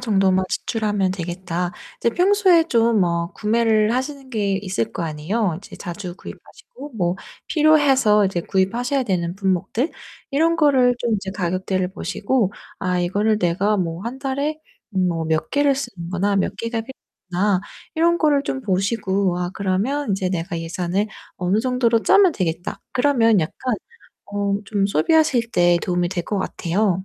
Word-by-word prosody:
정도만 195 -4 +2
지출하면 205 -4 0
되겠다.' 175 0 -3 0.3
이제 - - +2
평소에 370 - +4
좀 230 -3 +3
뭐 170 -1 0
구매를 220 0 +2
하시는 270 +1 -4
게 205 -4 0
있을 185 - -2
거 - - -4
아니에요. 165 +5 -1
이제 - - -12
자주 175 0 -6
구입하시고 295 - -12
뭐 175 -3 +1 0.3
필요해서 280 -9 +4
이제 185 -2 -2
구입하셔야 235 +10 0
되는 175 -5 -1
품목들 195 - 0 0.4
이런 325 +4 +3
거를 265 -6 +4
좀 235 -2 0
이제 195 -2 -3
가격대를 185 0 -1
보시고 200 +3 -1 0.3
'아 180 -1 0
이거를 205 +5 +1
내가 195 +4 +1
뭐 175 -1 -2
1 245 +4 -5
달에 280 +3 -2 0.4
음 185 -1 +3
뭐 165 -2 -2
몇 160 +6 0
개를 285 -1 +3
쓰는구나. 190 -4 -2
몇 195 - 0
개가 230 0 -3
필요하구나.' 200 -6 -2 0.3
이런 340 +2 +3
거를 295 -4 +3
좀 270 -1 -3
보시고 195 -2 0
'와 175 0 -2
그러면 210 +10 -1
인제 195 -2 0
내가 175 -1 -3
예산을 175 +4 -2 0.3
어느 185 +4 +1
정도로 240 -2 +1
짜면 390 -4 +5
되겠다.' 175 - -3
그러면 245 -5 +3
약간 235 +10 -2 0.6
어 200 0 0
좀 200 -2 0
소비하실 235 - +2
때 175 0 +4
도움이 175 -1 0
될 175 -2 -3
것 205 - -2
같아요. 190 +3 0
200 Hz, 325 characters per minute, -21 LUFS, 180-250 Hz, 0.6 s, 짜면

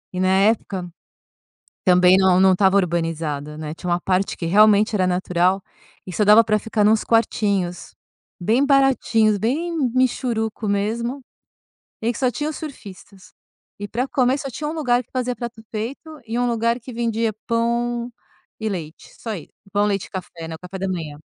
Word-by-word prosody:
E - - -2
na 185 - +2
época 195 -2 +1 1.0
também 180 0 +5
não 190 -1 +4
não 190 0 +6
estava 190 +1 +3
urbanizada, 165 -5 -1
né, 155 -1 -5
tinha 180 - -7
uma 175 - +2
parte 190 +2 0
que - - -6
realmente 210 +4 +4
era 185 -3 +2
natural 180 +1 +1 0.4
e 185 - -7
só 210 - +1
dava 215 +2 +7
pra 215 -1 +2
ficar 215 -1 -1
em - - +5
uns 220 0 +3
quartinhos 200 -5 0 0.4
bem 225 +10 +2
baratinhos, 255 -6 +3
bem 305 - -1 0.2
mixuruco 235 -4 0
mesmo, 230 +6 -1 0.8
em 225 +2 0
que 235 - -8
só 255 - +2
tinha 295 +4 -3
os - - -8
surfistas. 200 - -11 0.5
E 205 - -5
pra 250 +5 -2
comer 260 0 +2
só 275 -1 -5
tinha 300 +5 -5
um - - -4
lugar 250 -6 +1
que - - -40
fazia 250 -1 -2
prato 235 -1 -7
feito 275 +8 -6
e 230 +2 -2
um 245 - +1
lugar 235 0 0
que 250 +1 -10
vendia 230 -1 -1
pão 235 +1 -1 0.5
e 220 0 -2
leite, 165 -5 -7
só 225 - -4
i 170 - -10 0.2
pão 205 0 +2
leite 200 -2 -1
e - - -15
café, 175 -3 -7
né, 165 - -6
o - - -13
café 180 +2 -8
da 195 0 -3
manhã. 160 -5 -4
215 Hz, 185 wpm, -21 LUFS, 185-240 Hz, 1.0 s, dava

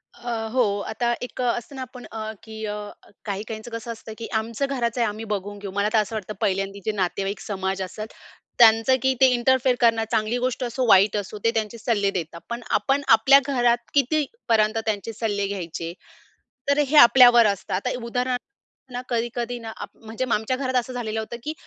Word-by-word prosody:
अ, 230 -2 -4
हो 255 -1 +4 0.3
आता 240 +2 0
एक 250 +1 -5
अ, - - 0
असतं 240 +4 -8
ना 265 - -6
आपण 255 -1 -9
अ, 220 -1 -5
की 220 -1 -9
अ, 210 0 -3 0.5
काही-काहींच 215 +2 -5
कसं 230 +1 -5
असतं 225 -1 -9
की 230 - -6
आमचं 225 +4 -1
घराचं 245 -3 -1
आहे 230 - +3
आम्ही 215 +2 -5
बघून 205 +1 -5
घेऊ. 200 -1 -6
मला 200 +2 0
तर - - +4
असं 210 +2 -5
वाटतं 215 0 -5
पहिल्यांदा 195 -1 -1
जी 220 - +1
नातेवाईक 195 +1 -2
समाज 190 -1 -3
असेल, 190 +3 -5 0.5
त्यांचं 225 +2 +6
की 265 +1 +3
ते 265 - +8
इंटरफेअर 255 +1 +3
करणं 230 -2 +3
चांगली 220 +1 +1
गोष्ट 255 0 -1
असो, 250 +1 -1
वाईट 200 0 +5
असो 205 +1 -5
ते 230 - +3
त्यांचे 220 0 -2
सल्ले 205 -3 0
देतात. 170 -3 -5
पण 235 0 -4
आपण 270 +7 +1
आपल्या 245 +5 +7
घरात 245 -3 +3 0.2
किती 290 +2 +2 0.2
पर्यंत 215 -1 +3
त्यांचे 220 0 -2
सल्ले 205 -3 -1
घ्यायचे? 170 -4 -5 0.8
तर 280 - +3
हे 295 - -1
आपल्यावर 245 -2 +8
असतं. 200 -2 -2
आता 200 +7 -1 0.2
उदाहरणार्थ 250 +1 -1 0.5
ना 245 0 -4
कधी-कधी 240 0 -2
ना 225 -1 -7
आप - - -6 0.2
म्हणजे 225 +4 -3
आमच्या 220 +4 +1
घरात 260 -1 -2
असं 250 +1 -6
झालेलं 225 -3 -3
होतं 220 +2 -5
की 305 - -3
225 Hz, 195 wpm, -24 LUFS, 210-245 Hz, 0.8 s, ते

